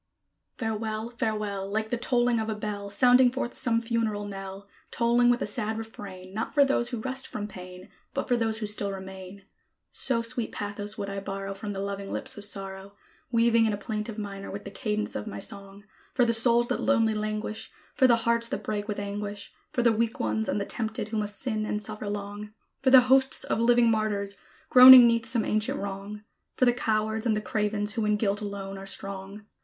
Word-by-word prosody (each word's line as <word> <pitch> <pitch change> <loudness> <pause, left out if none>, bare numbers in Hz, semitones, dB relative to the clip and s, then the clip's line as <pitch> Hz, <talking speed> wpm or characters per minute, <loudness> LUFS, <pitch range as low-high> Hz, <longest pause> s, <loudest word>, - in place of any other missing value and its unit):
Farewell! 220 0 -3
Farewell! 210 -4 -3
Like 220 +1 -2
the - - +2
tolling 240 0 +1
of 220 0 -2
a 220 - -2
bell, 205 -1 -5
Sounding 250 +4 +5
forth 245 -1 -4
some 230 -2 +2
funeral 225 -3 -1
knell, 195 0 -8 0.2
Tolling 240 +1 +3
with 245 +1 +2
a - - -1
sad 220 -3 -1
refrain, 195 -4 -9
Not 220 +6 -4
for 285 -1 +6
those 240 -3 +1
who 240 -2 -4
rest 260 +2 -4
from 210 -4 -5
pain, 185 -1 -11 0.3
But - - -2
for 245 - +2
those 225 -2 0
who 220 - -3
still 205 -1 0
remain; 190 0 -9 0.5
So 235 -3 +1
sweet 230 0 -3
pathos 205 +1 -5
would 200 -2 -4
I 195 - -3
borrow 195 0 -5
From 205 +1 -6
the 195 - -5
loving 200 0 -5
lips - - -4
of 205 - -4
Sorrow, 195 -1 -5 0.4
Weaving 230 -1 +4
in 215 - 0
a - - -2
plaintive 210 +1 -5
minor 200 -2 -6
with 200 +1 -7
the 200 - -7
cadence 215 -2 -3
of 105 - -4
my 100 - -6
song, 200 - -6 0.3
For 245 - +4
the 230 - +2
souls 235 +1 +4
that - - -1
lonely 225 -5 +2
languish, 215 0 -4 0.2
For 260 - +4
the 240 - +5
hearts 235 0 +2
that 275 - -4
break 210 -1 -3
with 210 - -3
anguish, 205 0 -5 0.2
For 245 - 0
the 235 -1 +4
weak 225 +1 -1
ones 110 0 -1
and - - 0
the 200 - -2
tempted, 220 -2 -3
who 220 - -3
must 210 -1 -2
sin 220 -4 -2
and 210 0 -2
suffer 210 0 -3
long; 205 +1 -6 0.3
For 265 - +3
the 260 -1 +9
hosts 265 +1 +4
of - - -1
living 235 0 +4
martyrs, 205 -2 -1 0.3
groaning 255 -1 +11
'neath 230 -1 +2
some 230 -3 +1
ancient 215 0 0
wrong; 200 +1 -6 0.3
For 255 - +4
the 245 - +4
cowards 220 -1 -1
and 215 -2 +2
the - - +1
cravens, 210 -1 -1
who 225 0 -1
in 210 0 +2
guilt 205 -1 0
alone 195 -1 -6
are 195 - -9
strong. 195 +1 -6
215 Hz, 210 wpm, -27 LUFS, 200-230 Hz, 0.5 s, groaning